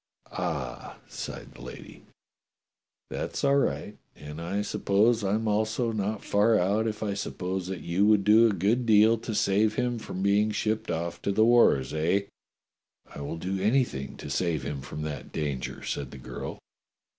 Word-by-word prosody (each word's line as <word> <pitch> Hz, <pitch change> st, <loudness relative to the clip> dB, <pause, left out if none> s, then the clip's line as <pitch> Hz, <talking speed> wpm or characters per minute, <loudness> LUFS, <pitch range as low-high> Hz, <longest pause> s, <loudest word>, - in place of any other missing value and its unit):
"Ah!" -, -, -4 dB
sighed -, -, -7 dB
the -, -, -14 dB
lady, -, -, -10 dB, 1.1 s
"that's -, -, -4 dB
all 140 Hz, 0 st, +4 dB
right, 105 Hz, -6 st, -1 dB, 0.2 s
and 75 Hz, +2 st, -8 dB
I 95 Hz, +5 st, -2 dB
sup 105 Hz, -, -5 dB
pose 110 Hz, +3 st, +3 dB
I'm 105 Hz, +3 st, 0 dB
also 110 Hz, +3 st, +1 dB
not 105 Hz, -1 st, -2 dB
far 105 Hz, +2 st, +3 dB
out 105 Hz, +5 st, +1 dB
if 110 Hz, 0 st, -3 dB
I 105 Hz, -2 st, -1 dB
suppose 95 Hz, -2 st, -3 dB
that 95 Hz, -2 st, -5 dB
you 95 Hz, +4 st, +1 dB
would 105 Hz, -2 st, +4 dB
do 110 Hz, +3 st, +6 dB
a -, -, +2 dB
good 110 Hz, +7 st, +1 dB
deal 110 Hz, +1 st, +6 dB
to 115 Hz, -1 st, -4 dB
save 105 Hz, +2 st, +2 dB
him 125 Hz, -2 st, -1 dB
from 95 Hz, -3 st, -5 dB
being 100 Hz, +2 st, +3 dB
shipped 110 Hz, +1 st, -1 dB
off 85 Hz, +1 st, -3 dB
to -, -, 0 dB
the 110 Hz, +3 st, +4 dB
wars, 115 Hz, -, +4 dB
eh?" 85 Hz, +6 st, +2 dB, 0.9 s
"I -, -, -7 dB
will 70 Hz, +3 st, -4 dB
do 95 Hz, +3 st, -3 dB
anything 105 Hz, -, 0 dB
to -, -, -7 dB
save 85 Hz, -6 st, 0 dB
him 70 Hz, 0 st, -4 dB
from 70 Hz, +2 st, -6 dB
that 75 Hz, -4 st, -6 dB
danger," 70 Hz, -5 st, -3 dB
said 70 Hz, -3 st, -3 dB
the 70 Hz, -, -10 dB
girl. 65 Hz, -, -7 dB
100 Hz, 175 wpm, -27 LUFS, 85-110 Hz, 1.1 s, do